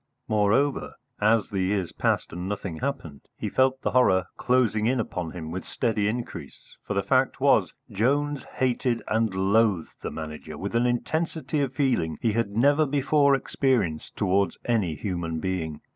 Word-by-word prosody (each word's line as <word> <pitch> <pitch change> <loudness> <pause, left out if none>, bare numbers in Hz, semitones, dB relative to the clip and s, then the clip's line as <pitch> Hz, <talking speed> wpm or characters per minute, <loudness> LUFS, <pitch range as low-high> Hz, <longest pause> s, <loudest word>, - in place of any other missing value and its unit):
Moreover, 110 +6 +1 0.2
as 110 +1 +3
the 100 - -2
years 95 -2 0
passed, - - -1
and 90 +2 -4
nothing 95 -5 -4
happened, 130 - -4 0.2
he - - -3
felt 130 0 +2
the - - 0
horror 95 -8 +4
closing 120 -4 +2
in 130 +1 +1
upon 90 -6 -3
him 80 -2 -7
with 95 +2 -4
steady 110 -3 -1
increase, 120 +3 -6
for - - -4
the - - +1
fact - - +2
was - - +3 0.2
Jones 145 +6 +1
hated 125 -2 0
and 110 -1 +1
loathed 100 -1 +2
the - - -3
Manager 75 -1 -7
with 100 +6 -5
an 120 +1 +3
intensity 155 +5 -1
of 135 -2 -1
feeling 120 - +1
he 115 - +1
had 115 -1 0
never 145 +8 +3
before 140 0 +3
experienced 120 - -1
towards 100 +1 +1
any 105 -10 +1
human 85 -1 -3
being. 80 -4 -3
110 Hz, 160 wpm, -26 LUFS, 95-130 Hz, 0.2 s, horror